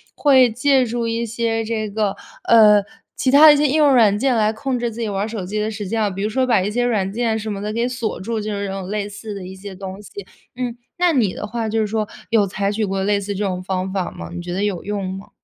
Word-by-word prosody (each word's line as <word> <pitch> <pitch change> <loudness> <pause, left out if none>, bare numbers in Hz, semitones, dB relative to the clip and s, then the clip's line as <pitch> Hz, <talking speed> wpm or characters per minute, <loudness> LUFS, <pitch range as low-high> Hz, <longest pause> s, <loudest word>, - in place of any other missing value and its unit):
会 260 -4 +5
借 260 +3 +2
助 235 -1 -2
一 230 +1 -1
些 225 0 -1
这 220 -1 -2
个， 210 -1 -1 0.3
呃， 210 -3 +6 0.3
其 260 - 0
他 285 +4 +8
的 305 - +10
一 - - +2
些 295 +1 +3
应 285 +3 +1
用 295 -3 +5
软 215 -5 +5
件 260 +3 +1
来 215 -1 +2
控 255 +3 -3
制 240 0 -1
自 230 +1 -9
己 230 - -1
玩 200 +2 -2
手 215 -5 -5
机 210 +3 -3
的 210 +1 -1
时 205 -2 -5
间 225 +2 -1
啊， 210 - +2
比 195 +1 -5
如 210 - 0
说 255 +3 0
把 235 -5 +4
一 200 +3 -2
些 245 +3 0
软 200 -5 0
件 225 -1 0
什 220 0 -4
么 200 - -6
的 210 +1 -3
给 235 +3 0
锁 235 -3 -3
住， 220 +3 -3
就 215 +1 -4
是 200 0 -3
这 195 - -4
种 195 -1 -5
类 205 0 -2
似 210 +1 -8
的 195 -2 -7
一 190 +1 -9
些 190 0 -9
东 190 +1 -8
西。 210 - -13 0.5
嗯， 245 -2 -3 0.2
那 350 -1 +3
你 225 -9 +2
的 210 - -6
话， 225 0 -3
就 225 +1 0
是 215 - +1
说 215 0 -2 0.2
有 225 -3 +3
采 200 +1 -2
取 215 +1 -1
过 195 -1 -2
类 205 +1 +2
似 200 +1 -4
这 205 +2 -1
种 185 -1 -3
方 185 0 -2
法 190 -2 -2
吗？ - - -8
你 175 - -5
觉 175 0 -5
得 195 +3 -1
有 200 -4 -2
用 200 -2 -3
吗？ 195 - -12
215 Hz, 305 characters per minute, -20 LUFS, 200-235 Hz, 0.5 s, 的